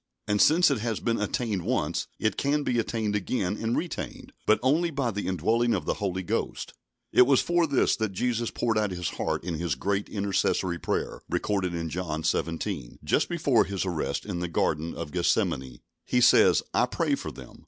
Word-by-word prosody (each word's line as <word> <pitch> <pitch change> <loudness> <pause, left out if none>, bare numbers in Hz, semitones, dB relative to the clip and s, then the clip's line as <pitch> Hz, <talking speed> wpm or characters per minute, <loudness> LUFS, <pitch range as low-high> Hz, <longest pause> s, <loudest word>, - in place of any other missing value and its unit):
And 105 -1 +2
since 165 0 +5
it 135 - 0
has 115 0 -2
been 115 -2 -1
attained 110 -3 -1
once, - - -1
it 110 - 0
can 145 +1 +1
be 120 -3 +1
attained 110 -2 -1
again 100 -1 -1
and 115 +2 -1
retained, 175 - -5
but 110 - +5
only 160 +6 +3
by 140 -6 -1
the 105 0 -4
indwelling 115 +7 +1
of - - -3
the - - +1
Holy 95 -3 -3
Ghost. - - -3 0.4
It 125 - +6
was 135 -2 +5
for 175 -1 +2
this 140 -3 +2
that 110 -3 -1
Jesus 115 +3 -1
poured 115 -2 0
out 105 -1 +1
His 90 -2 -3
heart - - -2
in 85 -3 -3
His 85 -6 -1
great 100 +8 -1
intercessory 95 -3 0
prayer, - - -2
recorded 95 -4 -1
in 85 -1 -3
John 80 -3 -3
xvii., 80 -9 -2
just - - +1
before - - +2
His 95 -1 -3
arrest 85 -4 -2
in 95 -4 -4
the 90 - -2
Garden 80 -1 -1
of 75 - -6
Gethsemane. 65 -7 0 0.2
He 125 - +1
says, 125 - +6
"I - - +3
pray - - 0
for - - -2
them.... - - -12
105 Hz, 195 wpm, -27 LUFS, 90-120 Hz, 0.4 s, It